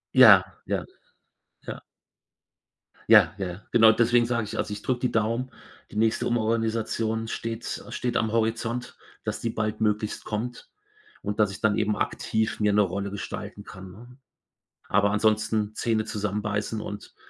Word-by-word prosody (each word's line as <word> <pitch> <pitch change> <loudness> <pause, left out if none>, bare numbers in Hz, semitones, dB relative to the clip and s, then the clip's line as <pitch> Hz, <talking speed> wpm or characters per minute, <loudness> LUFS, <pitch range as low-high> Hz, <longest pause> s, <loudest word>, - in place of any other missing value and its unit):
Ja, - - +9 0.2
ja, - - -2 0.8
ja. - - -5 1.3
Ja, - - +7
ja, 95 -1 -5
genau, 110 -1 +7
deswegen 120 +1 +3
sage 120 -2 -1
ich: 105 - -6
„Also, - - -2
ich 105 - -7
drücke 125 +1 -1
die 125 - 0
Daumen.” 115 +3 0 0.4
Die - - -12
nächste 110 +1 +2
Umorganisation 115 -1 0
steht 115 0 -4
steht 125 -1 -2
am 110 -1 0
Horizont, 115 +2 -1 0.3
dass - - -3
die 115 - -2
baldmöglichst 110 -1 -1
kommt 115 +3 -4 0.5
und 105 +1 -4
dass 105 -2 +3
ich 100 - -9
dann 110 -1 +2
eben 105 -1 +1
aktiv 110 +1 -1
mir 105 -1 +2
'ne 105 - +5
Rolle 100 +1 -2
gestalten 100 - -6
kann, 95 0 -11
ne? 120 +6 -14 0.7
Aber 100 +1 +3
ansonsten 110 0 +1
Zähne 110 -1 0
zusammenbeißen 105 +1 -2
und 105 0 -8
110 Hz, 145 wpm, -26 LUFS, 105-115 Hz, 1.3 s, Ja